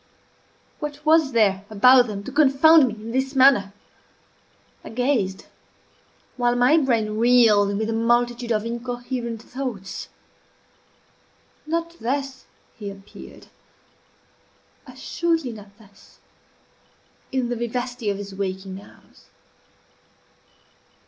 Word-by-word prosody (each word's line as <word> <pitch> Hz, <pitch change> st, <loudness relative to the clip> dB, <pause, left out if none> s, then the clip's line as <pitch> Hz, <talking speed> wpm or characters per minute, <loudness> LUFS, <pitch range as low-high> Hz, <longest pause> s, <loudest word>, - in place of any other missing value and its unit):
What 295 Hz, 0 st, -7 dB
was 315 Hz, -2 st, +4 dB
there 200 Hz, -5 st, +2 dB
about 245 Hz, +4 st, +5 dB
them 200 Hz, -2 st, -6 dB
to 270 Hz, -, -8 dB
confound 295 Hz, +1 st, +5 dB
me 225 Hz, -, -5 dB
in 220 Hz, +1 st, -9 dB
this 265 Hz, +2 st, -2 dB
manner? 255 Hz, -7 st, +5 dB, 1.1 s
I -, -, -9 dB
gazed, 225 Hz, -6 st, -1 dB, 0.9 s
while 245 Hz, -1 st, +1 dB
my 250 Hz, +6 st, +4 dB
brain 220 Hz, -6 st, 0 dB
reeled 220 Hz, -4 st, +4 dB
with 220 Hz, +1 st, -2 dB
a 225 Hz, -, -2 dB
multitude 240 Hz, +1 st, 0 dB
of 215 Hz, -1 st, 0 dB
incoherent 240 Hz, -1 st, -5 dB
thoughts. 245 Hz, -8 st, -6 dB, 1.6 s
Not 335 Hz, +1 st, -3 dB
thus 270 Hz, +2 st, -3 dB, 0.3 s
he 205 Hz, -3 st, -7 dB
appeared 195 Hz, 0 st, -13 dB, 1.4 s
assuredly 330 Hz, -6 st, -2 dB
not 205 Hz, -2 st, -13 dB
thus 205 Hz, -3 st, -21 dB, 1.1 s
in 260 Hz, -3 st, -1 dB
the 245 Hz, -, -2 dB
vivacity 240 Hz, -1 st, -3 dB
of 200 Hz, -, -2 dB
his 200 Hz, -1 st, -8 dB
waking 190 Hz, 0 st, -5 dB
hours. -, -, -20 dB
240 Hz, 105 wpm, -23 LUFS, 210-265 Hz, 1.6 s, about